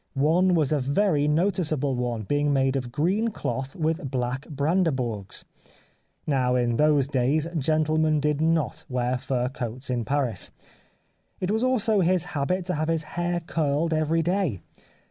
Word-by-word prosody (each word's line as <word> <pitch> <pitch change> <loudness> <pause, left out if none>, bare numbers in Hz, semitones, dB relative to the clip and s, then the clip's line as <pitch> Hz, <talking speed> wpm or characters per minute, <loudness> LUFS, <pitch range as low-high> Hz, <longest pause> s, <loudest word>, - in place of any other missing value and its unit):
One 170 +6 +3
was 155 -4 +1
a 150 - +2
very 145 +2 +1
noticeable 155 -4 +1
one, 120 -3 -2
being 145 +6 +1
made 135 -1 +2
of 125 -3 -3
green 185 - +1
cloth 135 -11 -4
with 160 -3 -1
black 130 +1 -2
hrandehourgs. 140 - -1 0.8
Now, 130 -4 +1
in 120 -2 +1
those 150 -3 +3
days 140 +4 +1
gentlemen 155 +1 +2
did 150 0 0
not 160 -6 0
wear 125 0 -1
fur 125 -1 -1
coats 125 0 -5
in 120 -2 -1
Paris. 130 -4 -1 0.9
It 185 +1 -1
was 220 +3 +1
also 225 -5 +2
his 180 -1 +2
habit 175 +6 -1
to 180 - -1
have 155 +1 -1
his 165 -1 0
hair 175 0 -1
curled 160 0 0
every 160 +1 +1
day. 175 - 0
150 Hz, 150 wpm, -25 LUFS, 130-165 Hz, 0.9 s, One